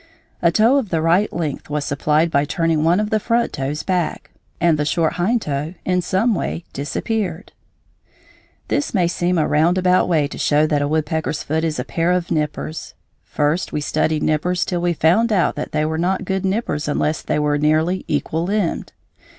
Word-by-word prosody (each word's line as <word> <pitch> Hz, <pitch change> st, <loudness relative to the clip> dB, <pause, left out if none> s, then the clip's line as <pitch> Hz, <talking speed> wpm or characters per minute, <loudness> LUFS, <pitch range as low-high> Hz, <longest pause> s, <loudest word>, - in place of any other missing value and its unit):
A 170 Hz, -, +4 dB
toe 225 Hz, +9 st, +4 dB
of 250 Hz, -8 st, -1 dB
the 165 Hz, -, 0 dB
right 170 Hz, +6 st, +2 dB
length 155 Hz, -5 st, -4 dB
was 150 Hz, -1 st, -2 dB
supplied 150 Hz, +3 st, +1 dB
by 140 Hz, -2 st, +3 dB
turning 160 Hz, +1 st, 0 dB
one 170 Hz, +4 st, +3 dB
of 210 Hz, 0 st, -2 dB
the 215 Hz, -, +2 dB
front 235 Hz, +2 st, 0 dB
toes 140 Hz, +2 st, -3 dB
back, 180 Hz, -3 st, -2 dB, 0.3 s
and 165 Hz, -3 st, +3 dB
the -, -, +2 dB
short 160 Hz, +2 st, +1 dB
hind 210 Hz, +7 st, 0 dB
toe 150 Hz, +4 st, -3 dB
in 180 Hz, -1 st, +1 dB
some 190 Hz, +7 st, +1 dB
way 175 Hz, -3 st, -3 dB
disappeared. 180 Hz, +6 st, -3 dB, 1.2 s
This 285 Hz, -5 st, -1 dB
may 180 Hz, -3 st, +3 dB
seem 175 Hz, +1 st, 0 dB
a 155 Hz, -, +2 dB
roundabout 180 Hz, +4 st, +3 dB
way 155 Hz, -4 st, +2 dB
to -, -, -8 dB
show 150 Hz, +1 st, +3 dB
that 150 Hz, -2 st, +1 dB
a 145 Hz, -, 0 dB
woodpecker's 155 Hz, 0 st, -1 dB
foot 160 Hz, +2 st, -1 dB
is 160 Hz, -2 st, -1 dB
a -, -, -1 dB
pair 170 Hz, +1 st, 0 dB
of 180 Hz, -1 st, -2 dB
nippers. 155 Hz, 0 st, -3 dB, 0.3 s
First 150 Hz, +4 st, -1 dB
we -, -, -1 dB
studied 155 Hz, +1 st, 0 dB
nippers 175 Hz, +4 st, 0 dB
till 175 Hz, -2 st, -2 dB
we 175 Hz, 0 st, +1 dB
found 180 Hz, +9 st, +3 dB
out 190 Hz, -5 st, +2 dB
that -, -, -5 dB
they 155 Hz, -, 0 dB
were 160 Hz, +1 st, -2 dB
not 185 Hz, +3 st, 0 dB
good 190 Hz, 0 st, -1 dB
nippers 190 Hz, -7 st, -1 dB
unless 150 Hz, +1 st, 0 dB
they -, -, -1 dB
were 150 Hz, -1 st, +1 dB
nearly 155 Hz, +5 st, +1 dB
equal 155 Hz, +3 st, -1 dB
limbed. 200 Hz, -2 st, -1 dB
165 Hz, 190 wpm, -20 LUFS, 150-185 Hz, 1.2 s, A